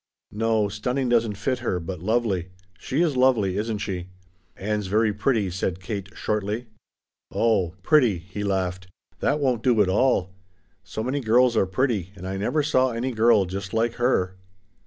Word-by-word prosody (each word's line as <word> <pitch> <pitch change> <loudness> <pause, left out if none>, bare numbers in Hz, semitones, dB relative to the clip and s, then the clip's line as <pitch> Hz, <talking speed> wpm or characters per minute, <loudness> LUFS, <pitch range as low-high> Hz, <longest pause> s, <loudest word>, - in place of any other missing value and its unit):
"No, 110 -1 +1
stunning 125 +6 -2
doesn't 115 -3 +2
fit 130 +5 -1
her, 90 - -1
but 90 +1 -6
lovely. 100 -2 0 0.3
She 140 +6 0
is 155 -5 0
lovely, 120 -8 +3
isn't 110 +1 -1
she?" 90 -3 -4 0.5
"Ann's 105 0 -2
very 105 +2 +2
pretty," 105 -2 0
said 90 0 -2
Kate 100 -1 -5
shortly. 105 +3 -2 0.7
"Oh 95 -7 +1
pretty," 125 - +4
he 95 +4 -7
laughed, 95 -2 -2 0.3
"that 145 +2 +1
won't 130 -5 +1
do 120 -2 +3
at 100 -3 +4
all. 95 -3 +2 0.5
So 110 - -5
many 130 +4 -1
girls 120 0 +3
are 95 - +3
pretty, 100 -3 -1
and 95 0 -8
I 95 +1 -3
never 125 +10 0
saw 130 -3 +3
any 120 +2 -2
girl 110 -3 +4
just 100 +3 -5
like 115 +1 +1
her." 95 -7 +1
110 Hz, 165 wpm, -24 LUFS, 95-125 Hz, 0.7 s, pretty